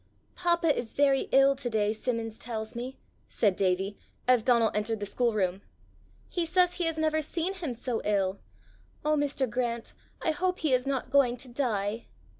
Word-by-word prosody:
"Papa 345 Hz, -3 st, +2 dB
is 230 Hz, -, -5 dB
very 275 Hz, -1 st, +3 dB
ill 275 Hz, +1 st, +6 dB
to 260 Hz, -3 st, -3 dB
day, 215 Hz, -2 st, +1 dB
Simmons 225 Hz, -1 st, -3 dB
tells 220 Hz, -2 st, -5 dB
me," 250 Hz, +3 st, -5 dB, 0.3 s
said 205 Hz, -4 st, +1 dB
Davie, 190 Hz, +1 st, 0 dB, 0.3 s
as 250 Hz, -2 st, +5 dB
Donal 235 Hz, -1 st, +3 dB
entered 210 Hz, +1 st, -1 dB
the 205 Hz, -, -3 dB
schoolroom. 205 Hz, -4 st, 0 dB, 0.7 s
"He 350 Hz, -, -1 dB
says 360 Hz, +2 st, +3 dB
he 350 Hz, -, 0 dB
has 325 Hz, -1 st, -1 dB
never 315 Hz, 0 st, +1 dB
seen 335 Hz, +4 st, -2 dB
him 330 Hz, -10 st, -4 dB
so 240 Hz, 0 st, -3 dB
ill. 195 Hz, -2 st, 0 dB, 0.7 s
Oh, 305 Hz, 0 st, +3 dB
Mr. 285 Hz, -2 st, 0 dB
Grant, 235 Hz, -1 st, -2 dB, 0.3 s
I 320 Hz, -, +1 dB
hope 365 Hz, +3 st, -1 dB
he 305 Hz, -5 st, +2 dB
is 255 Hz, +1 st, +2 dB
not 265 Hz, -2 st, -2 dB
going 255 Hz, -3 st, +4 dB
to 255 Hz, -, -9 dB
die!" 225 Hz, -4 st, -1 dB
250 Hz, 175 wpm, -29 LUFS, 220-295 Hz, 0.7 s, ill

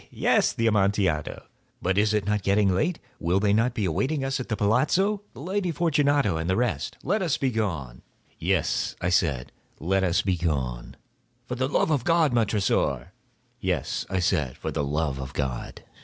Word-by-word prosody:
he!—yes, -, -, +2 dB
the 115 Hz, -, -1 dB
Amontillado. 100 Hz, -7 st, +1 dB, 0.3 s
But 95 Hz, +1 st, 0 dB
is 105 Hz, +1 st, +3 dB
it 105 Hz, -3 st, 0 dB
not 105 Hz, 0 st, 0 dB
getting 100 Hz, 0 st, +2 dB
late? 155 Hz, -, 0 dB, 0.2 s
Will 90 Hz, +3 st, +1 dB
not 110 Hz, +4 st, +2 dB
they -, -, -2 dB
be -, -, +1 dB
awaiting 130 Hz, -, 0 dB
us 135 Hz, 0 st, -1 dB
at 130 Hz, -, -6 dB
the 110 Hz, -, 0 dB
palazzo, 165 Hz, -, +2 dB
the 120 Hz, -, -11 dB
Lady 185 Hz, +3 st, -1 dB
Fortunato 145 Hz, -, +2 dB
and 80 Hz, +2 st, -3 dB
the 95 Hz, -, +2 dB
rest? 110 Hz, -, -1 dB
Let 205 Hz, +4 st, 0 dB
us 170 Hz, -6 st, +1 dB
be 135 Hz, -2 st, 0 dB
gone." 85 Hz, -, -3 dB, 0.4 s
"Yes," -, -, 0 dB
I 85 Hz, -, -1 dB
said, 70 Hz, -9 st, +1 dB, 0.3 s
"let 95 Hz, +4 st, +1 dB
us 85 Hz, -2 st, +2 dB
be 95 Hz, -2 st, 0 dB
gone." 65 Hz, -8 st, -2 dB, 0.5 s
"For 125 Hz, -, -5 dB
the 130 Hz, +1 st, 0 dB
love 160 Hz, -, +1 dB
of 140 Hz, -6 st, +1 dB
God, 165 Hz, -4 st, +3 dB
Montressor!" 100 Hz, -, +1 dB, 0.5 s
"Yes," -, -, -2 dB
I 95 Hz, -, -1 dB
said, 75 Hz, -7 st, 0 dB
"for -, -, -4 dB
the 75 Hz, -, -1 dB
love 75 Hz, -1 st, -1 dB
of 65 Hz, +1 st, -6 dB
God!" 65 Hz, -4 st, -4 dB
100 Hz, 185 wpm, -26 LUFS, 85-130 Hz, 0.5 s, is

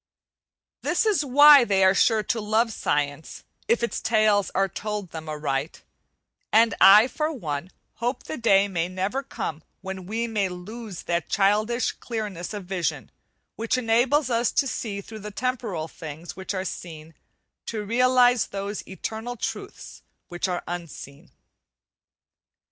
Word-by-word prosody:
This -, -, +1 dB
is 400 Hz, -9 st, +2 dB
why 285 Hz, +1 st, +8 dB
they 195 Hz, -4 st, +2 dB
are 190 Hz, 0 st, +6 dB
sure 215 Hz, +2 st, +3 dB
to 225 Hz, +3 st, -1 dB
love 220 Hz, +2 st, +1 dB
science 145 Hz, -1 st, -2 dB, 0.2 s
it 235 Hz, 0 st, +2 dB
its 235 Hz, -, -2 dB
tales 215 Hz, -2 st, +2 dB
are 195 Hz, +1 st, +3 dB
told 210 Hz, -1 st, -5 dB
them 160 Hz, -1 st, -7 dB
aright; 150 Hz, -1 st, -3 dB, 0.7 s
and 225 Hz, 0 st, +5 dB
I, 210 Hz, +4 st, +9 dB
for 305 Hz, +4 st, -2 dB
one, 160 Hz, -, -4 dB, 0.3 s
hope 245 Hz, +3 st, -2 dB
the -, -, -5 dB
day 200 Hz, -6 st, +3 dB
may 175 Hz, -4 st, -1 dB
never 190 Hz, +8 st, -2 dB
come 165 Hz, -, -5 dB, 0.2 s
when 190 Hz, -2 st, -7 dB
we 225 Hz, +3 st, -2 dB
may 210 Hz, -4 st, -1 dB
lose 200 Hz, +2 st, -8 dB
that 170 Hz, -1 st, -2 dB
childish 210 Hz, +5 st, +2 dB
clearness 210 Hz, -7 st, -5 dB
of 205 Hz, -3 st, -6 dB
vision, 180 Hz, -2 st, -3 dB, 0.5 s
which 230 Hz, +3 st, 0 dB
enables 255 Hz, +4 st, +2 dB
us 235 Hz, 0 st, +2 dB
through 220 Hz, -5 st, -3 dB
the 210 Hz, 0 st, -7 dB
temporal 215 Hz, -7 st, -3 dB
things 160 Hz, +1 st, -9 dB
which 190 Hz, +1 st, -5 dB
are 185 Hz, 0 st, -3 dB
seen, 160 Hz, -3 st, -8 dB, 0.5 s
to 215 Hz, -2 st, -4 dB
realize 245 Hz, +1 st, +4 dB
those 200 Hz, +1 st, -5 dB
eternal 220 Hz, +5 st, -5 dB
truths -, -, -6 dB, 0.3 s
which 175 Hz, +2 st, -2 dB
are 180 Hz, -1 st, -3 dB
unseen. 165 Hz, -5 st, -8 dB
205 Hz, 140 wpm, -25 LUFS, 180-235 Hz, 0.7 s, I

